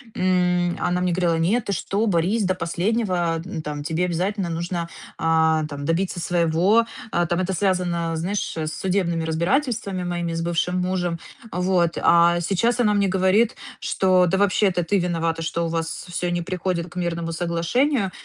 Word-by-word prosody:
м, 180 -1 +1
она 180 0 0
мне 180 0 +1
говорила: 170 -2 +1
"Нет, 215 +8 +1
ты 200 - -1
что, 200 +5 -1
борись 200 +3 +1
до 185 0 +1
последнего! 175 -1 -1
Ну, 180 -4 -5
там 150 -1 -5
тебе 160 +4 0
обязательно 180 +2 -1
нужно, 170 +1 -3 0.3
а, 160 -1 +2
там 145 -1 -6
добиться 175 +3 -1
своего". 175 +6 +2 0.3
А, 175 - +1
там 170 +1 -1
это 185 +1 -1
связано, 175 -3 0
знаешь, 185 +5 -2
с 155 -1 -2
судебными 180 -3 0
разбирательствами 190 - -1
моими 175 -1 -2
с 165 - -2
бывшим 175 +2 0
мужем. 180 -2 -1 0.3
Вот, 180 -1 +1
а 170 0 +5
сейчас 215 +8 +1
она 210 -4 +3
мне 200 -1 +2
говорит, 190 +5 +2 0.2
что- 185 -1 +3
да 190 +3 +1
вообще, 205 +1 +3
это 180 -2 0
ты 200 +3 +1
виновата, 165 -2 -1
что 165 +1 -1
у - - -1
вас 165 0 -3
всё 175 0 -2
не 175 -1 -1
приходит 180 -1 -2
к - - -15
мирному 170 -1 -2
соглашению. 180 - 0
175 Hz, 170 wpm, -23 LUFS, 165-190 Hz, 0.3 s, а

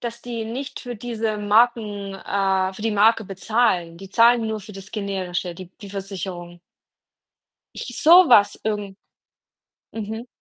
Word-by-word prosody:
dass 235 0 -6
die 235 -2 -5
nicht 255 +5 -6
für 245 -1 -6
diese 220 -2 -3
Marken, 210 -2 +1
äh 190 -1 0
für 210 - -9
die 225 - 0
Marke 220 +2 +3
bezahlen. 190 -3 0
Die 195 +1 -11
zahlen 230 +1 +4
nur 220 -1 -3
für 210 - -11
das 195 +1 -11
Generische, 185 -4 -3
die 180 0 -11
die 200 - -10
Versicherung. 185 -3 -7 1.2
Ich 245 -1 -6
sowas 305 - +7
irgend 205 -3 -3 1.0
mhm. 220 +2 -6
210 Hz, 140 wpm, -22 LUFS, 195-230 Hz, 1.2 s, sowas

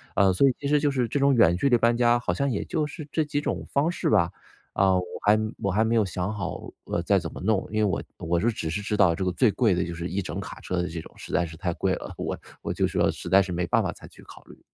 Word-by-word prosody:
啊， 95 -1 +4
所 135 +9 +4
以 - - 0
其 140 - -3
实 150 +1 +3
就 145 - +2
是 130 -3 0
这 140 +5 -1
种 140 0 +4
远 85 -7 +5
距 140 +10 +1
离 120 - +5
搬 115 0 +3
家 120 0 +4
好 120 - -1
像 140 0 0
也 105 - -2
就 155 -3 -1
是 150 0 -8
这 160 - +2
几 145 -1 -2
种 145 - -3
方 145 +4 +2
式 170 -2 -1
吧， 85 - +3 0.4
啊， 95 -1 +3
我 90 - +1 0.2
还 105 +1 +6 0.2
我 100 - -1
还 105 +4 +2
没 115 - 0
有 110 - +4
想 95 +2 -3
好， 95 -3 -5
呃， 85 - -1
再 100 +2 +3
怎 80 -3 -6
么 - - -9
弄， 100 +1 +1
因 110 - -2
为 105 - +3
我 95 - 0 0.3
我 85 +1 +2
是 120 +6 +2
只 80 -7 -4
是 100 +5 -2
知 105 0 -2
道 90 -4 +5
这 95 - -3
个 90 - 0
最 105 +6 +3
贵 110 -4 +2
的 90 +1 0
就 85 - -5
是 85 +1 -4
一 95 +3 -1
整 - - -5
卡 - - -8
车 90 - -3
的 90 - -3
这 85 - -5
种， - - -14
实 - - -10
在 90 - +2
是 80 -1 -9
太 90 +2 -2
贵 - - 0
了， - - -8
我 - - -3 0.3
我 - - -2
就 - - +1
说 - - +1
实 - - -7
在 95 +2 +6
是 95 - -6
没 90 0 -1
办 - - +2
法 - - -1
再 - - -13
去 - - -17
考 - - -14
虑。 - - -16
100 Hz, 335 characters per minute, -26 LUFS, 90-125 Hz, 0.4 s, 还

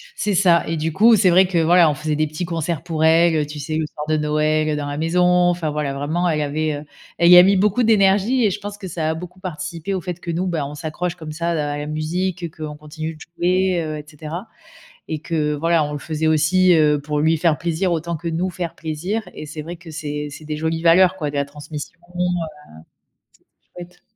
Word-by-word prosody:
C'est 205 -2 -1
ça 175 -2 +4
et 165 +1 -2
du 160 +1 -2
coup, 225 +6 +6
c'est 195 -3 +4
vrai 185 +2 +5
que, 180 -1 -1
voilà, 170 0 +5
on - - +1
faisait 150 +2 -2
des 155 +1 +1
petits 155 +4 -4
concerts 165 -1 -3
pour 160 -2 -2
elle, 165 +1 +5
heu, 150 -1 +1
tu 150 0 -8
sais, 155 +2 -3
le 160 - 0
soir 150 0 -7
de 155 0 +1
Noël, 155 +1 +1
heu, 150 - 0
dans 145 -1 -3
la 145 0 -4
maison, 165 +3 +1
enfin, 175 -2 +2
voilà, 150 -2 -2
vraiment 155 +6 -1
elle 155 -2 0
avait, 155 +1 -1
heu, 145 +1 -6 0.3
elle 170 - +4
y 180 - +10
a 180 - +10
mis 195 +2 +4
beaucoup 210 +5 +2
d'énergie 215 +3 +3
et 205 - +2
je 205 - -4
pense 205 0 -7
que 200 -2 -8
ça 160 -2 -2
a - - -1
beaucoup 180 +2 -9
participé 175 0 -5
au 190 - -2
fait 175 +1 -5
que 170 0 -5
nous, 175 +3 -1
ben, 165 -5 -1
on 145 +1 -7
s'accroche 165 +3 -4
comme 160 -3 -8
ça 170 +2 -2
à 145 -3 -1
la 145 - -4
musique, 170 +4 -2
heu, 170 - -3
qu'on 155 -1 -6
continue 155 +2 -7
de - - -18
jouer, 180 +1 0
heu, 155 -1 -4
et 150 - -7
cetera 160 +6 -7 0.6
et 155 - -3
que 155 -2 -1
voilà, 165 +1 +2
on 150 0 -4
le 145 - -4
faisait 155 +1 -2
aussi, 170 +4 +4
heu, 150 -2 +3
pour 150 0 -2
lui 160 +2 +3
faire 160 -1 +2
plaisir 170 +2 -1
autant 170 0 -2
que 170 - -6
nous 170 +3 -1
faire 175 -2 -5
plaisir 165 +7 -3
et - - -8
c'est 150 +1 -7
vrai 170 +3 -7
que 170 -1 -12
c'est 150 -2 -4
c'est 155 +2 -10
des 150 0 -4
jolies 160 +1 -2
valeurs, 180 +2 +5
quoi, 150 -5 -2
de 145 - -7
la 140 0 0
transmission, 150 +3 -9 0.2
heu, 180 - -2 1.5
c'était 175 - -7
chouette. 175 - -27
160 Hz, 250 wpm, -21 LUFS, 150-180 Hz, 1.5 s, y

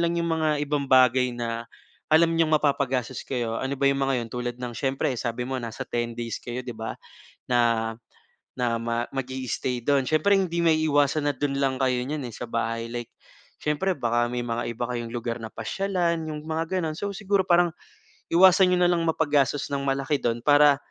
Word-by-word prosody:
lang 170 - -2
‘yong 170 - -1
mga 155 - +2 0.2
ibang 145 -1 -1
bagay 130 -1 +5
na 115 -1 -3 0.5
alam 165 +1 +5
niyong 165 -1 +2
mapapagastos 135 -4 0
kayo. 120 -4 -2
Ano 135 +1 -2
ba - - +2
‘yong 140 - +2
mga 135 0 +1
‘yon? - - -10
Tulad 120 0 -3
ng 125 -1 -4
siyempre, 135 0 0
sabi 120 +1 -3
mo, 135 - -2
nasa 115 -2 -5
10 120 0 -2
days 115 -1 -4
kayo, 120 +1 -5
‘di 125 - -5
ba, 110 0 -5 0.5
na 115 -2 +2 0.6
na 120 -2 0
ma 115 +1 -2
mag 135 -2 -2
i-i-stay 130 -1 -2
do’n. 140 +1 +2
Siyempre, 155 +6 +3
hindi 180 -3 0
maiiwasan 155 -2 +3
na 145 - +2
do’n 140 +1 -1
lang 135 -1 +1
kayo 130 -2 +1
niyan, 145 +2 -4
eh, - - -8
sa - - -6
bahay, 115 0 -2
like 120 -1 -4 0.5
siyempre, 165 +5 0
baka 120 -2 +1
may 120 0 -3
mga 120 0 -2
iba 120 - -4
kayong 120 -1 -3
lugar 120 0 -3
na 115 - -6
pasyalan, 170 - -1
yung 150 -1 -5
mga 160 +1 -1 0.2
gano'n. 155 -2 -3
So, 200 +2 -3
siguro 200 -1 0
parang 175 -1 +4 0.6
iwasan 185 +2 +6
niyo 180 - +2
na 175 - +4
lang 175 -1 +1
mapagastos 145 -3 +1
nang 140 0 -2
malaki 135 +2 0
dun 120 -1 -1
para, 145 -1 +6
135 Hz, 195 wpm, -25 LUFS, 120-155 Hz, 0.6 s, iwasan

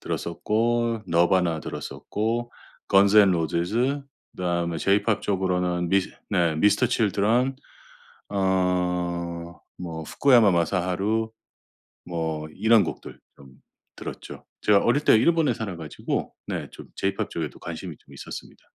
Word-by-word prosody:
들었었고 115 0 -1
너바나 85 -1 +2
들었었고 115 +10 -3 0.4
건즈 100 +2 +6
앤 100 -2 +7
로지즈 90 - 0 0.3
그다음에 85 -2 -1
제이팝 100 +3 +2
쪽으로는 90 -3 0
미스 95 -1 +2 0.2
네 85 -6 +2
미스터 105 +8 +3
칠드런 115 +3 +1 0.7
어 90 -3 -1 0.2
뭐 80 -3 -5
후쿠야마 120 - +4
마사하루 95 +5 0 0.7
뭐 80 -3 -3
이런 110 -1 +4
곡들 85 - -7 0.2
좀 70 - -15 0.5
들었죠. - - -9
제가 105 -1 +4
어릴 145 +5 +2
때 - - +6
일본에 155 +3 +3
살아 105 -6 -5
가지고 80 -3 -4
네 - - -4
좀 - - -11
제이팝 100 0 -1
쪽에도 80 -5 -5
관심이 - - -7
좀 - - -19
있었습니다. - - -9
95 Hz, 275 characters per minute, -25 LUFS, 85-110 Hz, 0.7 s, 앤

